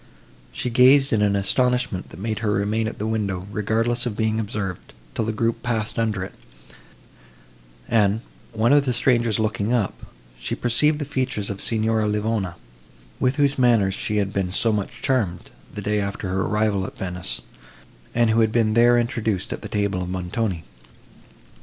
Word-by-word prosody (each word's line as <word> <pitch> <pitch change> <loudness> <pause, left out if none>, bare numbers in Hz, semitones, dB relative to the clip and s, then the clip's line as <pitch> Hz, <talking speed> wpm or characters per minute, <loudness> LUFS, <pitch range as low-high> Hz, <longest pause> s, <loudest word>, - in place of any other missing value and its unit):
She 125 - -3
gazed 130 +3 +5
in 110 - +2
an 100 -1 +3
astonishment 125 0 0
that 80 - -11
made 110 +1 -2
her 110 -2 -1
remain 105 +3 0
at 110 - -5
the 105 - -3
window, 100 -5 -2
regardless 115 +4 0
of 110 -3 -4
being 110 0 +1
observed, 100 -4 -4 0.2
till 110 - -1
the 110 - 0
group 115 +1 -1
passed 115 -1 -2
under 110 -4 0
it; - - -8 1.5
and, 110 -1 +2 0.3
one 115 +3 +2
of 145 -1 +5
the 125 - +1
strangers 120 -3 +2
looking 110 0 -1
up, 115 -6 +1 0.5
she - - -3
perceived 150 +6 +2
the 145 - -3
features 130 -7 -2
of 100 - -6
Signora 110 -1 +1
Livona, 105 -3 -1 0.6
with 130 +1 +2
whose 145 -1 +2
manners 115 -6 +4
she 105 +2 -2
had 100 -1 0
been 95 -2 0
so 110 +4 +2
much 100 -2 -4
charmed, 110 -10 0 0.2
the 105 - -6
day 105 +1 +1
after 100 -1 -4
her 95 +1 0
arrival 105 -2 0
at - - -11
Venice, 90 -10 -4 0.7
and 120 -1 +3
who 115 - +3
had 110 -1 +3
been 110 -1 +2
there 120 +1 +5
introduced 115 -4 -1
at - - -7
the - - -7
table 100 -3 0
of 90 - -4
Montoni. 90 0 -2
110 Hz, 175 wpm, -23 LUFS, 100-120 Hz, 1.5 s, gazed